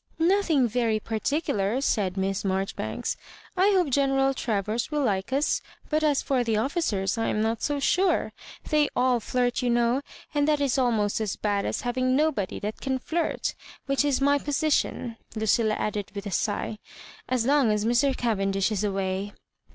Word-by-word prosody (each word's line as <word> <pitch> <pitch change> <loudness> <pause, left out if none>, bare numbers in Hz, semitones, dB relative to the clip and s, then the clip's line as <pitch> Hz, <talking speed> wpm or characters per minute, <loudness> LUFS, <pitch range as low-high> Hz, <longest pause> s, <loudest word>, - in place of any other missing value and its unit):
"Nothing 330 -6 +3
very 225 -1 0
particular," 220 -1 -1
said 200 -8 0
Miss 195 0 0
Marjori 195 0 -1
banks. 110 - -3 0.4
I 385 +3 +4
hope 355 -7 +2
General 270 0 +2
Travers 220 -2 -2
will 300 -2 0
like 200 -2 -1
us; 280 +3 +1 0.3
but 310 +1 +2
as 295 -3 +2
for 260 -3 +1
the 225 -2 0
officers, 225 - 0
I 225 - 0
am - - 0
not 225 0 -1
so 290 -1 0
sure. 360 +6 +2 0.4
They 300 -1 +3
<Ul 250 -1 +3
fiirfc, 245 +2 0
you 250 - 0
know; 240 +2 +2 0.3
and 290 -1 +2
that 300 -1 +3
is 275 -2 +1
almost 220 -4 +1
as 210 -3 -1
bad 205 -1 -1
as - - -2
having 255 +1 0
nobody 280 -10 0
that 210 +1 -4
can 265 -1 -1
flirt; 325 +6 -2 0.3
which 275 0 +1
is 285 -2 +1
my 285 +1 +3
posi 295 +2 -1
tion," 230 -4 -1 0.2
Lucilla 220 0 +2
added, 210 -2 -3
with 200 0 -5
a 200 - -4
sigh, 215 +2 -1 0.3
" - - -19
as 250 -3 +1
long 275 -4 +4
as 210 0 0
Mr. 255 +3 +2
Cavendish 195 -3 0
is 215 -1 -1
away." 195 0 -2
240 Hz, 180 wpm, -26 LUFS, 210-280 Hz, 0.4 s, I